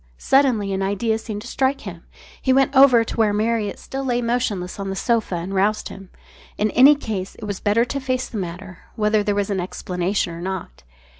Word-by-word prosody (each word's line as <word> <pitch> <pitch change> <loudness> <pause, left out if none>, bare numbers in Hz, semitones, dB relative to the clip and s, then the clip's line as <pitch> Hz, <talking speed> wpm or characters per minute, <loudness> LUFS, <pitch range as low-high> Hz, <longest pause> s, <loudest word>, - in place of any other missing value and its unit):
Suddenly 240 - +2
an 190 - -2
idea 205 +3 0
seemed 210 -2 -6
to - - -9
strike 270 +1 0
him. 175 -4 -9 0.4
He 260 - +1
went 270 +1 +3
over 260 -4 +7
to 225 - -7
where 215 -2 +3
Marriott 215 -1 0
still 270 0 -6
lay 245 -2 0
motionless 230 -7 -2
on 195 0 -3
the 195 - -3
sofa 225 -2 0
and 175 +3 -4
roused 205 +3 +1
him. 195 -1 -11 0.5
In 210 0 +1
any 275 +4 +7
case 210 -9 -5
it - - -9
was 205 -2 -4
better 215 +3 +2
to 275 +3 -3
face 255 -1 -2
the 220 - -5
matter, 185 +1 -7 0.2
whether 215 -1 +2
there 205 0 0
was 205 0 -1
an 195 - -1
explanation 180 0 -2
or 165 - -8
not. 185 - -5
210 Hz, 210 wpm, -21 LUFS, 195-240 Hz, 0.5 s, over